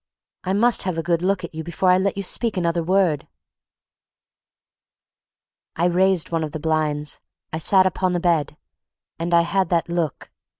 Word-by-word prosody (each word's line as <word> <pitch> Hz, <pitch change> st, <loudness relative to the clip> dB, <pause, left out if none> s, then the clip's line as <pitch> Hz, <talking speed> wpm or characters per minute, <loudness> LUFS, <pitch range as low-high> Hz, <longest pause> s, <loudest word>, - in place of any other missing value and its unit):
I 190 Hz, -, -1 dB
must 235 Hz, +3 st, +2 dB
have 185 Hz, -3 st, -2 dB
a 165 Hz, -, -2 dB
good 170 Hz, 0 st, 0 dB
look 190 Hz, +1 st, 0 dB
at 170 Hz, -, -7 dB
you 160 Hz, 0 st, -5 dB
before 170 Hz, +3 st, +1 dB
I 180 Hz, -, +4 dB
let 195 Hz, +1 st, -1 dB
you 200 Hz, -, -2 dB
speak 225 Hz, +2 st, 0 dB
another 170 Hz, -1 st, 0 dB
word!" 175 Hz, -3 st, +1 dB, 2.5 s
I 170 Hz, -, 0 dB
raised 180 Hz, -1 st, +2 dB
one 165 Hz, -1 st, 0 dB
of 150 Hz, -, -5 dB
the 155 Hz, -, -4 dB
blinds, 150 Hz, -2 st, -1 dB, 0.3 s
I 160 Hz, -, -2 dB
sat 185 Hz, +3 st, +4 dB
upon 185 Hz, 0 st, 0 dB
the 175 Hz, -, 0 dB
bed, 165 Hz, -4 st, 0 dB, 0.6 s
and 170 Hz, +1 st, -3 dB
I 170 Hz, 0 st, +5 dB
had 185 Hz, +1 st, 0 dB
that 170 Hz, -1 st, 0 dB
look. 170 Hz, -4 st, -3 dB
175 Hz, 175 wpm, -22 LUFS, 160-185 Hz, 2.5 s, I